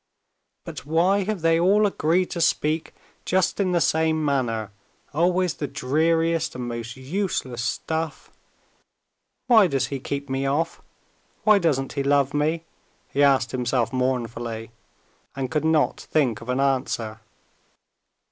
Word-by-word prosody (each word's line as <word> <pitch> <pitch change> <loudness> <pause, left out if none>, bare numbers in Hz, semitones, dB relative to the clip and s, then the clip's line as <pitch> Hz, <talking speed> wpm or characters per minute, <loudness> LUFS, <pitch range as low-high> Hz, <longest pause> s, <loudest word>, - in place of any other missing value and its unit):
"But - - -7
why 175 +6 +2
have 210 -3 -2
they 165 0 +3
all 200 +5 +4
agreed 180 -2 +1
to 170 - -3
speak 155 0 0 0.3
just 185 +2 +1
in 190 -2 +1
the 175 - +2
same 160 -1 +1
manner 115 -7 -1 0.4
always 180 +3 +2
the 145 - -4
dreariest 165 +5 +1
and 125 -1 -4
most 120 0 -5
useless 130 - -3
stuff? 160 +7 -3 1.1
Why 225 -6 +6
does 135 -5 0
he 135 - -2
keep 140 +2 -4
me 135 0 -1
off; 155 +4 -1 0.6
why 215 -2 +6
doesn't 140 -7 0
he 140 - -1
love 140 0 +2
me?" 155 +3 0 0.5
he 140 - 0
asked 135 -3 +4
himself 125 0 0
mournfully, 120 -3 -2 0.6
and 130 -2 -3
could 155 -1 0
not 160 -1 +2
think 125 -9 0
of 115 - -10
an 125 +1 0
answer. 125 -5 -1
145 Hz, 140 wpm, -24 LUFS, 130-165 Hz, 1.1 s, Why